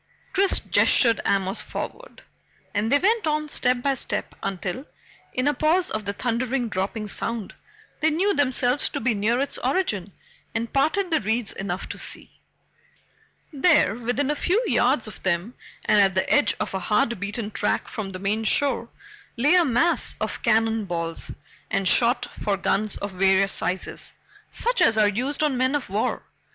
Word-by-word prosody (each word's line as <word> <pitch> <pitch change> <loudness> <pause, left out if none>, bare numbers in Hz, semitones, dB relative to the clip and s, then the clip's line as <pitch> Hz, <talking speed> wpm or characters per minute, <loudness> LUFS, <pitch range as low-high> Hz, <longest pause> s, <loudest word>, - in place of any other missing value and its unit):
Chris 390 0 +3
gestured 230 -3 +3
Amos 195 +1 +1
forward, - - -7 0.5
and 215 +3 0
they 285 - +6
went 420 +3 +2
on 305 0 0
step 250 -3 +1
by 275 - +2
step 265 - -2
until, 195 - -4 0.4
in 255 +2 -1
a 290 - +3
pause 320 +6 +1
of 215 -1 -3
the 200 - -2
thundering 245 +2 -1
dropping 205 +2 -3
sound, 225 0 -2 0.5
they 315 - +3
knew 375 +6 +1
themselves 260 -3 +1
to - - -4
be 235 0 +1
near 215 +4 +1
its 280 - -2
origin 245 - -1 0.4
and 230 0 -3
parted 335 +7 +1
the 315 - +2
reeds 220 +1 -1
enough 195 -1 -4
to - - -6
see. - - -6 1.1
There, 280 - +4
within 245 +5 -1
a - - -1
few 380 +10 +1
yards 250 - +2
of 215 - -11
them 185 +5 -1 0.3
and 210 - +4
at 190 -2 +3
the 190 - +1
edge 260 -9 +3
of - - -3
a 190 - -1
hard 220 +4 +1
beaten 205 +2 -4
track 210 - -1
from 200 -3 -5
the 185 - -6
main 205 +4 -1
shore, 235 0 +1 0.5
lay 285 +8 +4
a 360 -1 +6
mass 325 +5 +1
of - - -3
cannon 225 -1 +2
balls 165 -2 -3 0.4
and 195 - 0
shot 240 +6 +3 0.2
for 200 -2 0
guns 205 +1 0
of 200 - -5
various 190 +1 +3
sizes, 185 +1 -2 0.4
such - - -1
as 220 - +5
are 215 -1 +5
used 255 +9 -1
on 290 -4 +1
men 260 +3 +1
of 270 -9 -3
war. 210 +3 -1
235 Hz, 170 wpm, -24 LUFS, 200-285 Hz, 1.1 s, they